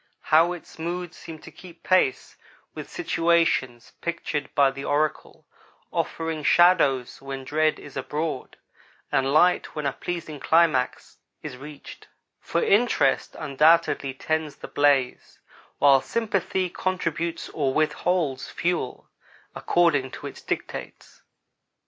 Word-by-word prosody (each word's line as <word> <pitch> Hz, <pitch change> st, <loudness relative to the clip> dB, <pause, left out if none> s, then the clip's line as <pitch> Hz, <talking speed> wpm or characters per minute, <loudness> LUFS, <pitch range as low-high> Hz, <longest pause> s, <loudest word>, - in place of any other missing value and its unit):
How 165 Hz, +3 st, +6 dB
its 175 Hz, -2 st, -12 dB
moods 175 Hz, +1 st, -4 dB
seem 165 Hz, -1 st, -10 dB
to -, -, -12 dB
keep 175 Hz, -2 st, -15 dB
pace 185 Hz, -8 st, +1 dB, 0.4 s
with -, -, -8 dB
situations 165 Hz, -8 st, 0 dB
pictured 165 Hz, -4 st, -3 dB
by 140 Hz, -2 st, +4 dB
the 135 Hz, +1 st, -8 dB
oracle, 150 Hz, +1 st, -2 dB, 0.5 s
offering 160 Hz, -1 st, -2 dB
shadows 145 Hz, -8 st, +3 dB
when 135 Hz, -1 st, -6 dB
dread 155 Hz, +3 st, +1 dB
is -, -, -12 dB
abroad, 150 Hz, -3 st, -4 dB, 0.5 s
and 135 Hz, 0 st, +1 dB
light 175 Hz, +4 st, +3 dB
when 150 Hz, -1 st, -3 dB
a 140 Hz, -, 0 dB
pleasing 165 Hz, -3 st, -5 dB
climax 155 Hz, -6 st, +1 dB, 0.3 s
is -, -, -6 dB
reached; 145 Hz, +2 st, -11 dB, 0.3 s
for 170 Hz, -, -1 dB
interest 230 Hz, +5 st, +2 dB
undoubtedly 150 Hz, -1 st, +2 dB
tends 155 Hz, +1 st, -2 dB
the -, -, -9 dB
blaze, 140 Hz, -3 st, +1 dB, 0.4 s
while 140 Hz, -2 st, +5 dB
sympathy 195 Hz, -4 st, -1 dB
contributes 170 Hz, -2 st, -3 dB
or 140 Hz, -3 st, -1 dB
withholds 155 Hz, -1 st, 0 dB
fuel, 170 Hz, -7 st, -2 dB, 0.5 s
according 160 Hz, -7 st, +2 dB
to -, -, -10 dB
its -, -, -8 dB
dictates. -, -, -6 dB
155 Hz, 120 wpm, -25 LUFS, 140-170 Hz, 0.5 s, How